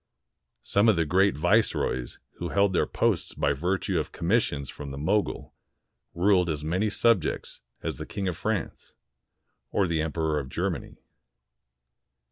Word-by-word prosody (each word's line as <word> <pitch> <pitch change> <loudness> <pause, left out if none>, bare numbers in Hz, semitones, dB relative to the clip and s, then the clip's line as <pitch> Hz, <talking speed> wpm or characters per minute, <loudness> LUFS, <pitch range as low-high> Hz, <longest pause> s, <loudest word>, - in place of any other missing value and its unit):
Some 105 +3 +3
of 110 - +5
the 85 -1 +1
great 95 +4 +3
viceroys 90 - +1 0.2
who 85 - -4
held 100 +2 +2
their - - +2
posts - - 0
by 75 - +1
virtue 90 +4 0
of 75 - -4
commissions 85 - 0
from 75 -1 -8
the 70 - -7
Mogul 100 +9 -1 0.6
ruled 90 0 +3
as 75 -2 -2
many 95 +7 0
subjects 105 -5 +1 0.2
as - - -3
the - - -7
King 100 -1 -3
of 90 - -1
France 110 +4 -3 0.7
or 100 - +2
the 85 -3 0
Emperor 80 -1 0
of 65 -2 -6
Germany. - - -3
90 Hz, 145 wpm, -27 LUFS, 75-100 Hz, 0.7 s, of